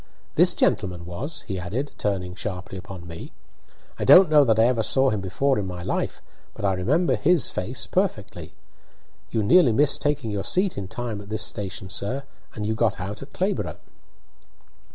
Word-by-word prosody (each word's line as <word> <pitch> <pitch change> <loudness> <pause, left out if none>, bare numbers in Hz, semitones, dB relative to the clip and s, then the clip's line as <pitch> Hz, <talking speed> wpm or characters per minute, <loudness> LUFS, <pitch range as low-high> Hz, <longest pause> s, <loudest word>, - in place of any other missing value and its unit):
This - - +5
gentleman 90 -4 0
was," 115 - -6
he 95 -3 -5
added, 110 +12 -4
turning 95 -3 -2
sharply 95 0 -5
upon 95 -2 -9
me. 80 0 -9 0.7
"I - - -1
don't 185 -3 +8
know 150 -1 +7
that 110 -5 +2
I 110 - +5
ever 120 -1 +2
saw 135 +4 +2
him 105 -2 -2
before 130 +8 0
in 100 - -3
my 90 -1 -6
life, - - -3 0.3
but - - -4
I 95 - +2
remember 130 - +1
his 155 +7 +3
face 125 +9 -3
perfectly. 105 - -2 0.7
You 110 - 0
nearly 130 - +5
missed 140 +5 +3
taking 145 -6 -1
your 100 -1 -2
seat 185 0 +1
in 100 -2 -5
time 115 0 -5
at 100 - -13
this 110 0 -1
station, 95 -3 -4
sir, 125 +10 -2 0.3
and 105 - -4
you 110 - 0
got 110 -2 0
out 100 +3 -5
at 135 - -10
Clayborough." 195 +3 -2
105 Hz, 180 wpm, -24 LUFS, 95-135 Hz, 0.7 s, don't